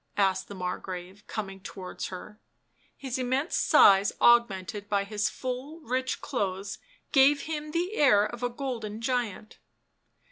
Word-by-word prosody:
asked 190 -2 +2
the 200 - -8
Margrave, 185 +1 -6
coming 195 -3 -5
towards 190 -1 -7
her; 210 +3 -10 0.6
his 260 -2 -4
immense 260 +6 0
size 195 0 +6
augmented 205 -4 +3
by 200 -1 +1
his 210 +1 -1
full 260 +5 -5
rich 260 -1 -2
clothes 195 0 -3 0.3
gave 280 +1 +5
him 305 -1 -4
the 345 +5 -1
air 250 - +5
of 240 +2 -7
a 245 - 0
golden 240 -5 -5
giant. 230 -3 -3
220 Hz, 135 wpm, -28 LUFS, 195-260 Hz, 0.6 s, size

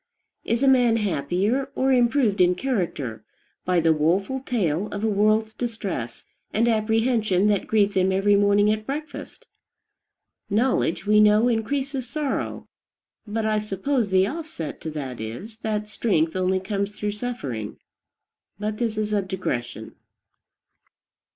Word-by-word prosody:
Is 235 +3 0
a - - +4
man 245 -4 +4
happier, 200 - 0
or 265 +1 +2
improved 240 -5 +3
in 180 0 +4
character, 175 - -3 0.4
by 180 -1 +2
the 165 -1 +4
woful 185 - +1
tale 205 - -1
of 205 0 -5
a - - +2
world's 215 +1 +2
distress 200 - -5 0.3
and 225 +3 +2
apprehension 220 -3 +2
that 205 -2 0
greets 205 -2 +2
him 190 -1 +2
every 195 +2 +3
morning 205 +1 +4
at 215 0 -3
breakfast? 300 +3 -6 1.0
Knowledge, 215 -5 +1
we 210 +1 +4
know, 210 +2 +5
increases 260 +2 -1
sorrow; 295 +1 -3 0.6
but 220 +1 -2
I 215 -1 +1
suppose 210 +3 -1
the 190 0 +4
offset 295 - -6
to 160 - -4
that 135 -6 -6
is, 190 - -7
that 210 -2 -2
strength 175 -7 0
only 185 0 +1
comes 200 +1 -3
through 210 0 -3
suffering. 205 - -5 0.8
But 210 +1 -3
this 225 -3 -1
is 210 0 -1
a 205 - +2
digression. 120 - -4
210 Hz, 140 wpm, -24 LUFS, 185-230 Hz, 1.0 s, know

